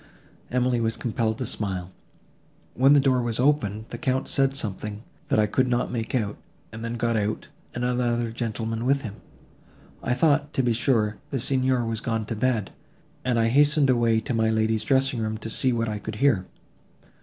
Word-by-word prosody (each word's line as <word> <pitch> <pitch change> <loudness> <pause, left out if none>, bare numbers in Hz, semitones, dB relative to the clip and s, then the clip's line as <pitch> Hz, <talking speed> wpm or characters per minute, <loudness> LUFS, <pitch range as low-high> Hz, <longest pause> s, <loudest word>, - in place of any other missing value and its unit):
Emily 125 -1 +1
was 115 0 -1
compelled 110 -1 -1
to 130 - -3
smile. 95 -6 -3 0.8
"When 135 +3 +5
the 145 - +7
door 130 -2 +2
was 120 -1 -2
opened, 110 -6 +1
the - - -6
Count 130 -3 0
said 135 -1 +2
something, 105 -3 -4 0.2
that - - +1
I 110 - +4
could 130 +5 +1
not 125 0 0
make 115 +1 -3
out, 105 -4 -1 0.4
and 115 0 -7
then 115 0 -3
got 115 0 0
out, 105 0 -2 0.3
and 120 0 -1
another 120 -2 0
gentleman 115 -1 -3
with 140 0 +2
him. 105 -3 -6 0.8
I 125 - 0
thought, 145 +1 +2
to 130 - +1
be 120 -1 +2
sure, 110 -3 +1
the 135 - -2
Signor 130 -1 +1
was 115 0 -3
gone 115 -2 -2
to 115 - -4
bed, 110 -3 0 0.5
and 125 -2 +1
I 115 0 +3
hastened 145 +1 +4
away 115 -2 +3
to 120 - -3
my 110 -1 +2
lady's 110 0 +1
dressing 135 +1 +2
room, 110 0 -2
to 110 +1 -5
see 130 - +2
what 115 -1 0
I 105 -1 -3
could 110 +1 -6
hear. 110 -7 +2
115 Hz, 190 wpm, -25 LUFS, 110-130 Hz, 0.8 s, the